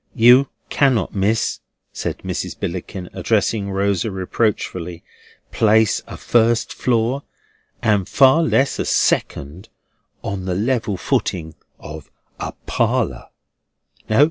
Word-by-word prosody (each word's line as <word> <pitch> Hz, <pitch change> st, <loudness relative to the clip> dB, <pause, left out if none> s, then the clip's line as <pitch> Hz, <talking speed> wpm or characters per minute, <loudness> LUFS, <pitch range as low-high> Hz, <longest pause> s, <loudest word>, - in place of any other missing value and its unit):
You 125 Hz, +3 st, +6 dB, 0.2 s
cannot, 130 Hz, -7 st, +2 dB
Miss," 105 Hz, +3 st, 0 dB, 0.3 s
said -, -, -3 dB
Mrs. -, -, -4 dB
Billickin, 90 Hz, +1 st, -5 dB
addressing 105 Hz, -2 st, 0 dB
Rosa 100 Hz, +1 st, 0 dB
reproachfully, 95 Hz, -3 st, -2 dB, 0.5 s
"place 110 Hz, -1 st, +3 dB
a -, -, -8 dB
first 115 Hz, 0 st, +2 dB
floor, 120 Hz, +2 st, 0 dB, 0.6 s
and 105 Hz, -4 st, +2 dB
far 135 Hz, +4 st, +5 dB
less 140 Hz, -4 st, +1 dB
a -, -, 0 dB
second, 80 Hz, +9 st, 0 dB, 0.5 s
on 95 Hz, -2 st, -4 dB
the 90 Hz, -1 st, -1 dB
level 110 Hz, -1 st, 0 dB
footing 80 Hz, -2 st, -1 dB, 0.3 s
"of 75 Hz, 0 st, -9 dB, 0.3 s
a -, -, -4 dB
parlour. -, -, 0 dB
105 Hz, 105 wpm, -20 LUFS, 95-120 Hz, 0.6 s, You